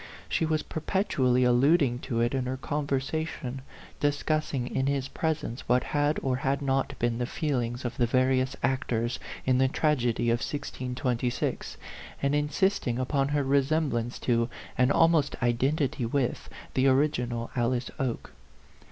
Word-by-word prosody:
She 160 - 0
was 155 -1 0
perpetually 150 -7 +1
alluding 125 +1 +4
to 115 -2 +1
it 120 +2 +1
in 130 -2 -1
her 130 +1 -2
conversa 145 +2 -1
tion, 130 -3 -6 0.4
discussing 145 -2 0
in 130 +1 -1
his 140 -1 0
presence 155 -7 -3
what 125 +1 +4
had 145 +1 +1
or 130 -2 +1
had 135 +1 0
not 135 0 0
been 120 0 0
the 120 - -1
feelings 125 -6 -2
of 120 0 -3
the 120 - +2
various 130 +2 +2
ac 130 0 +2
tors 120 +1 -1 0.3
in 130 -1 +3
the 130 - +4
tragedy 125 -5 +1
of 115 - +2
1626, 125 -3 -2 0.4
and 140 0 +1
insisting 150 -2 +1
upon 135 +2 +1
her 145 0 +1
resemblance 135 -3 +1
to, 115 -1 +1 0.3
and 130 +1 +3
almost 165 -2 +3
identity 130 +1 +1
with, 125 0 -1 0.2
the 130 +1 +3
original 125 -4 +1
Alice 120 0 0
Oke. 130 -3 -3
130 Hz, 145 wpm, -28 LUFS, 125-145 Hz, 0.4 s, alluding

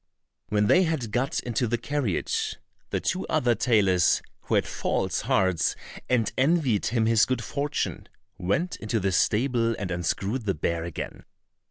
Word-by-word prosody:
When 105 0 +2
they 180 - +5
had 160 - -1
got 125 +5 0
into 120 0 -1
the 120 +2 0
carriage, 120 - -1 0.3
the - - -1
two - - -2
other 120 -1 +2
tailors, 100 -6 +3 0.2
who - - 0
had - - +3
false - - -1
hearts 95 -4 +1 0.3
and 120 -3 +1
envied 135 - +2
him 115 -1 +1
his 115 0 +4
good 130 -3 0
fortune, 145 +4 -3 0.3
went 100 - -1
into 110 +1 -1
the 95 0 0
stable 115 +5 +2
and 95 -2 -4
unscrewed 95 +7 -2
the 95 - +1
bear 85 +2 -1
again. 85 -3 -6
115 Hz, 155 wpm, -26 LUFS, 95-130 Hz, 0.3 s, they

